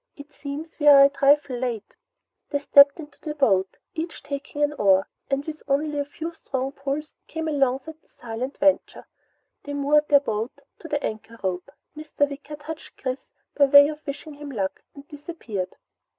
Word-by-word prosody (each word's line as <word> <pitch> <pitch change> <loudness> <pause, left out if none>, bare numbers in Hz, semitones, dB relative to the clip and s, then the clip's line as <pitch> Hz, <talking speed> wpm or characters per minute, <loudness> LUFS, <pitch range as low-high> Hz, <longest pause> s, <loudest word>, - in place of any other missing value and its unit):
It 285 0 -13
seems 300 +3 -7
we 295 - +1
are 280 -1 +10
a 275 - +7
trifle 280 -2 +3
late!" 240 -4 -4 0.6
They 285 - 0
stepped 280 +1 +6
into 295 -2 -11
the 300 -2 -5
boat, 195 -10 +2 0.2
each 325 +1 -5
taking 285 +1 -4
an 295 0 +1
oar, 195 -7 +3 0.2
and 275 +1 -1
with 310 -1 -6
only 290 +1 0
a 285 - -1
few 320 +4 -6
strong 265 -4 -3
pulls 280 +2 -4
came 320 0 -4
alongside 280 +2 -1
the - - -36
silent 245 +3 -6
Venture. 290 -1 +1 0.6
They 285 0 -6
moored 295 +1 +3
their 285 - +6
boat 225 -3 -4 0.2
to 330 - -9
the 290 -2 -2
anchor 220 +1 -5
rope. 180 +4 -2 0.3
Mr. 300 -1 -1
Wicker 285 +1 -8
touched 300 +2 -9
Chris 260 0 -4 0.3
by 285 - +6
way 285 +1 +8
of 305 0 -7
wishing 295 +2 -6
him 290 0 -9
luck, 195 -8 -3
and 280 0 -12
disappeared. 280 - -6
285 Hz, 180 wpm, -24 LUFS, 265-300 Hz, 0.6 s, are